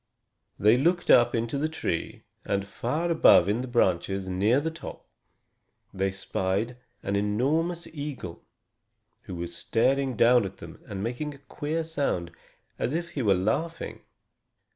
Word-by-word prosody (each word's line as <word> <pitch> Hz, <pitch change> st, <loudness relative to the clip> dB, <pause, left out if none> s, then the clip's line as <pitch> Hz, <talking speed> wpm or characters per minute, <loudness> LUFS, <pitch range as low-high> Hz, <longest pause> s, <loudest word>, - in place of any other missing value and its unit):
They 110 Hz, +5 st, +5 dB
looked 175 Hz, +5 st, +2 dB
up 120 Hz, 0 st, +6 dB
into 115 Hz, +4 st, -1 dB
the 155 Hz, +2 st, 0 dB
tree, 85 Hz, -, -3 dB, 0.2 s
and 100 Hz, 0 st, -1 dB
far 150 Hz, +12 st, -2 dB
above 130 Hz, -, +6 dB
in 105 Hz, +4 st, +1 dB
the 130 Hz, -, -5 dB
branches, 95 Hz, -4 st, +1 dB
near 100 Hz, +8 st, +2 dB
the 160 Hz, +3 st, -2 dB
top, 160 Hz, -, -9 dB, 0.9 s
they 95 Hz, 0 st, 0 dB
spied 95 Hz, +4 st, -2 dB, 0.3 s
an 100 Hz, -, -1 dB
enormous 145 Hz, +12 st, 0 dB
eagle, 140 Hz, -, -6 dB, 0.8 s
who 95 Hz, -, -6 dB
was 85 Hz, 0 st, -5 dB
staring 130 Hz, +1 st, +1 dB
down 120 Hz, +1 st, +6 dB
at 95 Hz, -, -6 dB
them, -, -, -11 dB
and 100 Hz, -1 st, -5 dB
making 130 Hz, +6 st, -3 dB
a 140 Hz, -, -20 dB
queer 155 Hz, +3 st, -2 dB
sound, 140 Hz, -, -2 dB, 0.5 s
as 135 Hz, -, -1 dB
if 170 Hz, 0 st, -2 dB
he 140 Hz, -, -3 dB
were 100 Hz, -5 st, +4 dB
laughing. 110 Hz, -, -2 dB
120 Hz, 145 wpm, -27 LUFS, 100-150 Hz, 0.9 s, up